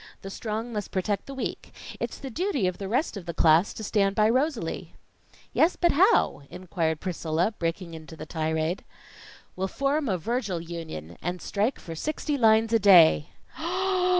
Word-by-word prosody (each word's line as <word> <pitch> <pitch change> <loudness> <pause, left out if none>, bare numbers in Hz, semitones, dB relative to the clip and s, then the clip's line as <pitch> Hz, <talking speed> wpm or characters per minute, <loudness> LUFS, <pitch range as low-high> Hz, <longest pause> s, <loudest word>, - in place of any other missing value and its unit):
The 195 - -6
strong 225 +3 -4
must 210 -2 -3
protect 195 +1 -2
the 275 - -7
weak. 265 - -5 0.2
It's - - -4
the 270 -2 -7
duty 325 - 0
of 180 -1 -1
the 195 - -4
rest 245 - 0
of 180 -3 -9
the 170 - -4
class 165 +4 +4
to 220 - -6
stand 200 -2 +1
by 215 +1 +4
Rosalie." 255 - -1 0.6
"Yes, 335 +3 +3
but 345 -1 +3
how?" 370 - +3
inquired 165 -4 -2
Priscilla, 175 +2 -1
breaking 170 +1 -3
into 160 0 -10
the 155 - -8
tirade. 160 +2 -2 0.7
"We'll 190 +1 -1
form 275 +5 0
a 190 - +1
Virgil 205 -1 -2
Union, 165 - -7
and 180 0 -3
strike 215 +9 -1
for 165 - -8
sixty 295 - -2
lines 225 -2 +4
a 225 - +5
day." 175 -7 +7
195 Hz, 170 wpm, -26 LUFS, 165-235 Hz, 0.7 s, day